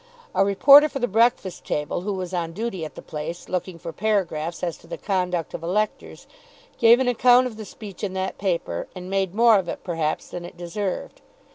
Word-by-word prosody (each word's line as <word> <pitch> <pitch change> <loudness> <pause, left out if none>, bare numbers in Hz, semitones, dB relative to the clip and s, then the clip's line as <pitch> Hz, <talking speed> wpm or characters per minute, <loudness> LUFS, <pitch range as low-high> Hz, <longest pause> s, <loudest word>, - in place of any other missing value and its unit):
A - - +3
reporter 275 +10 +7
for 280 - -5
the 245 -2 0
"Breakfast 225 -3 +1
Table" 150 +3 -2
who 205 +2 -2
was 185 -1 -5
on 165 -2 -2
duty 200 -3 -4
at 155 - -7
the - - -10
place, 160 +3 -6
looking 185 -1 -3
for 165 0 -7
paragraphs 175 -6 -1
as 170 -2 -1
to - - -18
the - - -6
conduct 180 -4 -2
of - - -5
electors, 205 +6 -2 0.5
gave 235 +1 +7
an 260 - +1
account 245 +1 +5
of 245 -3 -5
the 215 0 -8
speech 200 -2 -10
in 195 -2 -2
that 190 0 -3
paper, 170 - -2
and 185 0 -8
made 195 -1 0
more 230 -2 +6
of 175 -3 -5
it, - - -6
perhaps, 165 -4 -2
than 175 - -6
it 175 - -10
deserved. 185 - -4
190 Hz, 210 wpm, -24 LUFS, 175-220 Hz, 0.5 s, reporter